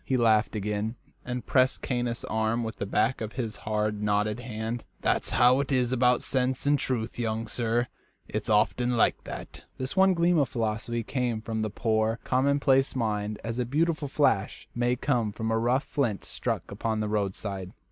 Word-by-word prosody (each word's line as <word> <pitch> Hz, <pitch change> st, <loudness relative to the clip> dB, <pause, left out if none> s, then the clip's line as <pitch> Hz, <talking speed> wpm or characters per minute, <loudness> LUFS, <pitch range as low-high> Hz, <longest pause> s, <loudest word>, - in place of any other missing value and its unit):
He 130 Hz, -, 0 dB
laughed 110 Hz, -2 st, +3 dB
again, 105 Hz, +2 st, -2 dB, 0.3 s
and 125 Hz, 0 st, -4 dB
pressed 130 Hz, -1 st, +2 dB
Caius' 120 Hz, -2 st, -1 dB
arm 110 Hz, +2 st, 0 dB
with 110 Hz, 0 st, -5 dB
the 100 Hz, -, -3 dB
back 110 Hz, +6 st, +1 dB
of 110 Hz, 0 st, -4 dB
his 115 Hz, -5 st, -3 dB
hard, 105 Hz, -1 st, -1 dB
knotted 105 Hz, +1 st, +1 dB
hand. 115 Hz, -1 st, -4 dB, 0.2 s
"That's -, -, +1 dB
how 125 Hz, +2 st, +5 dB
it 140 Hz, 0 st, -2 dB
is 125 Hz, -2 st, +2 dB
about 125 Hz, -1 st, +3 dB
sense 130 Hz, 0 st, 0 dB
and 145 Hz, 0 st, +3 dB
truth, 120 Hz, -4 st, -2 dB
young 115 Hz, -1 st, -1 dB
sir 120 Hz, +1 st, 0 dB, 0.4 s
it's -, -, -4 dB
often 120 Hz, +3 st, +2 dB
like -, -, +2 dB
that." -, -, -8 dB
This 130 Hz, +5 st, -4 dB
one 190 Hz, -1 st, +5 dB
gleam 170 Hz, 0 st, +3 dB
of 140 Hz, -, +2 dB
philosophy 115 Hz, 0 st, -2 dB
came 120 Hz, -2 st, -1 dB
from 110 Hz, 0 st, -3 dB
the 110 Hz, -, -1 dB
poor, 110 Hz, +1 st, +1 dB
commonplace 135 Hz, +1 st, +2 dB
mind 105 Hz, -3 st, -1 dB
as 115 Hz, +1 st, -3 dB
a -, -, +2 dB
beautiful 155 Hz, +3 st, 0 dB
flash 135 Hz, -8 st, +1 dB
may 120 Hz, +1 st, +1 dB
come 120 Hz, -4 st, 0 dB
from 110 Hz, +2 st, -3 dB
a 110 Hz, -, +2 dB
rough 125 Hz, +4 st, +2 dB
flint 120 Hz, -9 st, -1 dB
struck -, -, -3 dB
upon 110 Hz, -1 st, -2 dB
the 105 Hz, -, -1 dB
roadside. 100 Hz, -2 st, -2 dB
115 Hz, 180 wpm, -28 LUFS, 110-130 Hz, 0.4 s, how